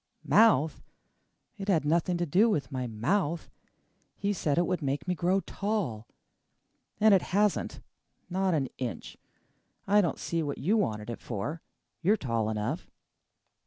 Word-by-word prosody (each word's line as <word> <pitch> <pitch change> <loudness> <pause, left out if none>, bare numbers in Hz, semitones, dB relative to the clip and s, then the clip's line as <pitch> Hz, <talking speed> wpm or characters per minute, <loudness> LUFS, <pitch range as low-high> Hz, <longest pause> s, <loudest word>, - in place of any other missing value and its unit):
"Mouth? 180 - +4 0.8
It 195 - -5
had 165 -7 +2
nothing 170 +3 +1
to 175 - 0
do 195 +9 +4
with 150 -8 -1
my 130 -2 -2
mouth! 150 - -1 0.7
He 205 0 0
said 155 -5 0
it 175 - +3
would 180 -1 -1
make 140 +2 -2
me 180 - +1
grow 180 +3 +1
tall. 195 - -3 0.9
And 215 -1 +6
it 190 - +5
hasn't 205 +1 0 0.5
not 190 -1 +1
an 135 -4 0
inch! 125 -3 -5 0.7
I 205 +1 +5
don't 175 - -1
see 165 -1 -2
what 145 -2 -3
you 195 +10 +1
wanted 110 - -1
it 115 - -7
for! 140 +9 -4 0.4
You 195 +5 +4
are - - +1
tall 115 - -1
enough." 110 +10 -3
170 Hz, 155 wpm, -29 LUFS, 135-195 Hz, 0.9 s, And